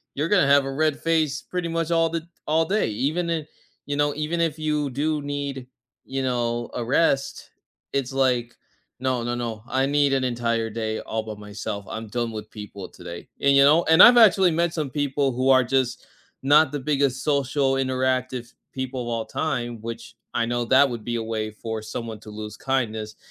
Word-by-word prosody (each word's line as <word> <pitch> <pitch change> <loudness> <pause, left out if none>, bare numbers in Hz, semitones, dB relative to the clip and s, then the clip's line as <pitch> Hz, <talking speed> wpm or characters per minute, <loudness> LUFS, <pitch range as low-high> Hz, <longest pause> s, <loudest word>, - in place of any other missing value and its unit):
you're 150 +4 -1
gonna 185 -8 +4
have 140 0 +5
a 135 - -3
red 155 0 +1
face 155 -4 +1
pretty 180 -2 -4
much 165 0 -1
all 165 -1 +3
the 165 0 -4 0.2
all 160 +2 +2
day. 205 - +1
Even 145 +11 -1
if 155 -2 -2 0.4
you 145 - -1
know, 145 0 +1
even 155 +3 -2
if 160 -1 -1
you 150 -2 0
do 150 +3 -1
need, 140 -2 -4 0.4
you 135 0 -3
know, 120 -2 -1
a 120 - -2
rest, 135 +1 +1 0.4
it's 135 -1 -1
like, 125 -3 +1 0.4
"No, 130 -2 -1
no, 120 0 -2
no, 115 -3 -4
I 135 +2 +1
need 145 -1 +2
an 135 -1 +1
entire 115 -2 -1
day 110 0 -3
all 110 0 -3
by 110 -1 -6
myself, 105 0 -6
I'm 110 0 -5
done 120 +1 -2
with 110 0 -7
people 105 -3 -8
today," 85 -1 -9
and, 140 0 +4
you 140 - +7
know 155 +5 +5
and 160 +2 +9
I've 245 0 +9
actually 195 -5 +6
met 170 +1 +1
some 155 -4 -2
people 140 -1 0
who 130 +2 0
are 130 -1 +6
just 125 0 -1 0.4
not 145 +1 +5
the 145 - -3
biggest 135 -2 0
social 140 -2 +1
interactive 130 -2 -1 0.2
people 130 -1 -4
of 120 - -7
all 115 -1 -2
time, 120 -7 -3
which 115 0 -7 0.2
I 120 -1 +1
know 120 0 -1
that 135 +4 +5
would 120 -3 -6
be 120 - -2
a 115 - -3
way 110 -1 -3
for 110 0 -5
someone 110 0 -6
to 110 - -12
lose 105 0 -7
kindness, 110 -5 -2
130 Hz, 200 wpm, -24 LUFS, 115-150 Hz, 0.4 s, and